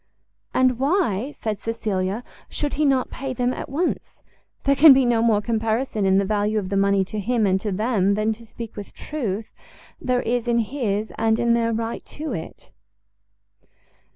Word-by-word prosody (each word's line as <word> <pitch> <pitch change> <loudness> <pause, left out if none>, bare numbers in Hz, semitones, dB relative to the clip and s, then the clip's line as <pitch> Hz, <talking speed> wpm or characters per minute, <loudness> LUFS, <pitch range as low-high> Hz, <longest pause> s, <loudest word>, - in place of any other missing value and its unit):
"And 255 -2 +2
why," 270 - +1
said 215 -7 -4
Cecilia, 215 -2 -2 0.3
"should 295 -1 -3
he 300 +2 +1
not 265 -2 +2
pay 265 -1 -4
them 250 0 0
at - - -6
once? 325 +6 -2 0.5
There 280 0 +3
can 290 +1 +9
be 265 -1 +3
no 235 -2 +2
more 220 -3 +3
comparison 225 -1 0
in 190 0 +4
the 195 - +2
value 210 +1 0
of 195 -3 -2
the 200 - -1
money 195 0 +3
to 215 +3 -5
him 230 +2 +1
and 190 -1 +2
to 210 - -2
them, 200 -1 +1
than, 215 +1 +1
to 230 +2 -14
speak 230 0 -9
with 205 -1 -9
truth, 225 -8 -4 0.5
there 250 -1 0
is 240 0 -1
in 235 0 +2
his 220 -3 -1
and 220 0 +2
in 235 0 +2
their 230 0 +1
right 225 +1 -3
to 310 +1 -5
it." - - -8
225 Hz, 180 wpm, -23 LUFS, 205-255 Hz, 0.5 s, can